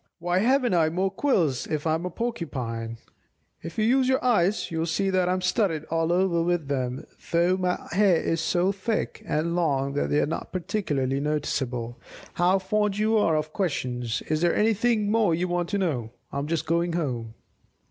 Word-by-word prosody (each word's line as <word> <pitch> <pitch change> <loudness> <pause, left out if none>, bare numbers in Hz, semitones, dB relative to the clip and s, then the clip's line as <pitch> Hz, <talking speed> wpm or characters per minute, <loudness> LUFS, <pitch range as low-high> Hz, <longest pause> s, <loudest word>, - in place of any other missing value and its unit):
Why 175 +2 0
haven't 250 +1 +2
I 165 -3 +3
more 185 +4 0
quills 185 - +1
if 155 0 -3
I 160 - +2
am 165 +3 -1
a - - -3
Porcupine? 125 - -4 0.6
If 165 0 -8
you 215 - +2
use 255 +2 +3
your 260 -1 +1
eyes, 205 -6 +2
you'll 165 0 -1
see 195 +4 0
that 185 -1 +2
I - - +2
am 185 - -1
studded 185 -4 0
all 165 0 +1
over 175 -1 +2
with 170 -4 0
them, 130 -2 -2 0.3
though 170 +2 +3
my 180 -1 -1
hair 195 -1 +4
is 165 0 -1
so 175 +3 +1
thick 200 +3 -3
and 165 +3 0
long 140 -5 0
that 145 - -1
they 145 - +2
are - - +2
not 160 +2 -5
particularly 145 -8 -1
noticeable. 130 -5 -2 0.3
How 180 +2 +3
fond 205 +1 0
you 215 +1 +2
are 165 -7 +3
of 155 0 -3
questions! 125 - -2
Is 155 0 -1
there 175 0 +2
anything 220 0 +2
more 215 -7 +3
you 180 +2 -1
want 175 -1 -1
to 205 - 0
know? 145 - -1 0.2
I'm 140 +1 -3
just 160 -1 -1
going 170 +1 0
home." 120 -9 -3
170 Hz, 190 wpm, -26 LUFS, 150-195 Hz, 0.6 s, hair